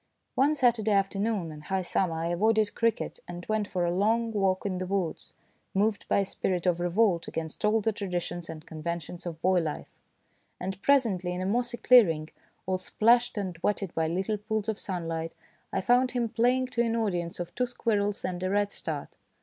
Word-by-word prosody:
One 285 +3 +3
Saturday 235 -6 +3
afternoon 195 -2 0
in 150 -1 -9
high 190 +4 -2
summer 175 -1 0
I 165 +1 -2
avoided 215 +4 +2
cricket 230 -2 0
and 175 0 -7
went 215 -1 0
for 180 -3 -1
a 170 - 0
long 225 +4 +2
walk 195 -3 +1
in 185 -2 -1
the 185 - -3
woods, 185 -4 -3 0.4
moved 205 +1 +1
by - - +2
a - - -1
spirit 185 -1 -1
of 175 -1 +2
revolt 175 0 +2
against 160 -1 -5
all 215 +1 +3
the 225 - +1
traditions 175 -4 -4
and 160 -1 -8
conventions 170 +2 -5
of 165 -2 -6
boy 185 0 +4
life; 155 -3 -4 0.7
and 190 +1 -4
presently, 205 -11 +2
in 180 - -3
a - - -2
mossy 240 +4 0
clearing, 165 -13 +5 0.3
all 185 0 0
splashed 235 +5 +3
and 185 -4 -3
wetted 200 -3 -1
by 160 -1 +1
little 190 +6 -1
pools 215 0 -2
of 220 -1 -2
sunlight, 165 -4 -4 0.4
I 195 - 0
found 245 +4 +3
him 240 -2 0
playing 250 +3 +2
to 235 - 0
an 230 -1 +1
audience 180 -7 -1
of 175 0 -5
two 250 +5 0
squirrels 205 -4 -1
and 180 -1 -3
a 185 - 0
redstart. 205 +1 -1
195 Hz, 190 wpm, -28 LUFS, 175-225 Hz, 0.7 s, clearing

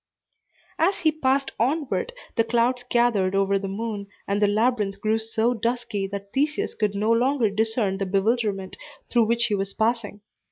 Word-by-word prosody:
As 370 +3 +2
he 315 -2 +4
passed 275 -3 0
onward, 285 - 0 0.2
the 230 - +3
clouds 245 +2 +1
gathered 215 -6 +2
over 195 0 +2
the 195 - -4
moon, 205 0 -4 0.2
and 200 +1 0
the 205 - +5
labyrinth 210 -1 +1
grew 220 +1 +1
so 225 +2 0
dusky 230 -3 -2
that 200 0 -7
Theseus 295 +3 0
could 210 -2 -1
no 215 +3 +1
longer 240 -1 +2
discern 215 -2 0
the 195 - -1
bewilderment 200 -1 0 0.3
through 235 -2 +4
which 235 +1 +2
he 225 - -1
was 195 -1 -2
passing. 220 -2 -1
225 Hz, 165 wpm, -24 LUFS, 200-245 Hz, 0.3 s, the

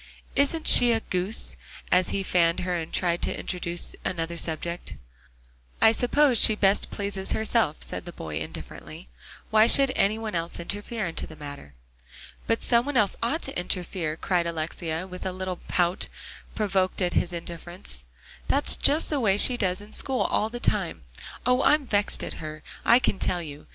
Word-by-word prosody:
"Isn't 295 +3 +1
she 245 -1 +7
a 225 - +1
goose?" 190 +1 -3 0.4
as 180 0 +3
he 195 - -1
fanned 170 -1 +2
her, 180 0 -2
and 165 -2 -4
tried 175 -1 0
to - - 0
introduce 175 -1 -3
another 170 -1 -3
subject. 170 +1 -4 0.8
"I 220 - +6
suppose 250 +2 +3
she 215 - +7
best 200 -1 +2
pleases 200 -1 -2
herself," 220 -7 +1
said - - -5
the 175 - -7
boy 80 - -6
indifferently. 80 -5 -8 0.4
"Why 220 +1 +6
should 275 +1 +6
any 205 +2 +2
one 225 -1 -5
else 170 0 -3
interfere 205 +4 -4
in 165 - -4
the 160 - -4
matter?" 145 - -10 0.7
"But 230 - 0
some 235 +2 +2
one 290 -3 -1
else 205 -4 +3
ought 280 +9 -1
to 270 - -2
interfere," 175 -3 -2
cried 175 -2 0
Alexia, 165 +1 -4
with 180 -1 -9
a 190 - -2
little 185 0 -4
pout, 175 0 +1 0.5
provoked 195 -3 0
at 175 - 0
his 175 - +1
indifference; 170 - -8 0.4
"that's - - +4
just 300 +3 +3
the 295 - +1
way 200 -5 +2
she 250 +4 +5
does 190 -4 -1
in 210 +1 -13
school 265 -2 0
all 215 - +1
the 240 +1 -6
time. - - -1 0.4
Oh! 250 +1 +3
I'm 300 -1 +3
vexed 205 -4 0
at - - -4
her, 155 -1 -7 0.2
I 235 - +6
can 205 -6 0
tell 175 -1 -1
you. 150 -1 -10
185 Hz, 175 wpm, -26 LUFS, 170-225 Hz, 0.8 s, she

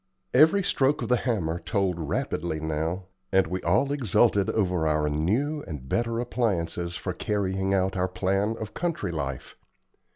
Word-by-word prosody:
Every 160 +6 +6
stroke 135 -5 +2
of 115 - -4
the 125 - +5
hammer 95 -10 -1
told 95 -5 -1
rapidly 80 +1 -2
now, 80 +4 -2 0.3
and 95 -1 +4
we 90 +3 -3
all 110 +12 +2
exulted 115 -6 +2
over 90 -6 +1
our 75 -1 +1
new 115 - 0
and 75 -7 -7
better 115 - 0
appliances 90 -8 -1
for - - -3
carrying 95 -1 -1
out 95 0 +1
our 90 0 +1
plan 95 +4 0
of 110 - -6
country 165 - -2
life. 70 -5 -4
95 Hz, 155 wpm, -26 LUFS, 85-115 Hz, 0.3 s, Every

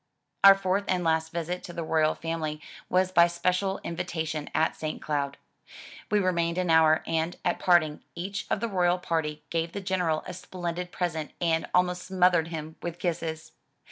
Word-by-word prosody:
Our 195 0 +10
fourth 195 +1 0
and 180 -1 +1
last 160 0 +1
visit 170 +1 -3
to 175 - -8
the 170 - -4
royal 155 -1 +2
family 160 -2 -3 0.3
was 185 0 +2
by 170 -1 +6
special 185 +3 0
in 170 - -4
vitation, 155 -3 -3
at 160 +1 +1
St. 155 -1 -4
Cloud. 140 -2 -2 0.7
We 210 - +3
remained 170 -3 +1
an 180 -2 +1
hour, 160 -1 +5
and, 165 +1 -1
at 175 - +1
parting, 165 -4 +3
each 195 +4 -4
of 205 - 0
the 230 - 0
royal 180 -3 +2
party 160 -4 -2
gave 165 0 -1
the - - -3
General 180 -5 0
a 180 - -6
splendid 180 0 -5
present 160 -4 -3
and 165 -2 0
almost 180 0 +2
smothered 180 -3 +3
him 160 -1 -6
with 170 -1 -5
kisses. 160 -2 -3
170 Hz, 175 wpm, -27 LUFS, 160-180 Hz, 0.7 s, Our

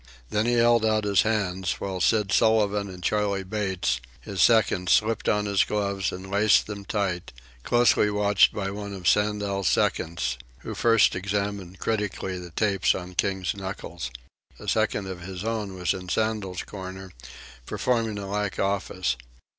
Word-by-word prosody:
Then 105 +2 +1
he 120 - +2
held 120 -1 +4
out 110 -1 +2
his 100 -2 +3
hands, 95 -5 0
while 95 -2 -4
Sid 105 -4 +2
Sullivan 105 -1 +3
and 90 -1 -10
Charley 100 0 0
Bates, 95 - -1 0.2
his 95 -3 -3
seconds, 100 -5 +4
slipped 110 +1 +2
on 105 0 +1
his 100 -1 +3
gloves 100 -2 -1
and 95 +1 -8
laced 105 +1 +4
them 100 -2 -7
tight, 95 -4 -2 0.3
closely 120 - +3
watched 105 0 +4
by 95 -2 -3
one 100 0 -6
of 90 -2 -4
Sandel's 105 -2 +1
seconds, 65 -6 0 0.2
who - - -6
first 115 -2 +4
examined 100 -1 -3
critically 105 -4 -2
the 90 -1 -8
tapes 100 +3 +1
on 90 0 -6
King's 95 0 -1
knuckles. 95 -7 -6 0.5
A - - -11
second 100 - +1
of 95 -2 -6
his 90 +1 -6
own 110 -4 -3
was 90 -1 0
in 90 -1 -7
Sandel's 105 -3 -1
corner, 95 -1 -8 0.6
performing 115 -4 0
a 100 - -5
like 100 0 -2
office. 95 -7 -1
100 Hz, 155 wpm, -26 LUFS, 95-105 Hz, 0.6 s, held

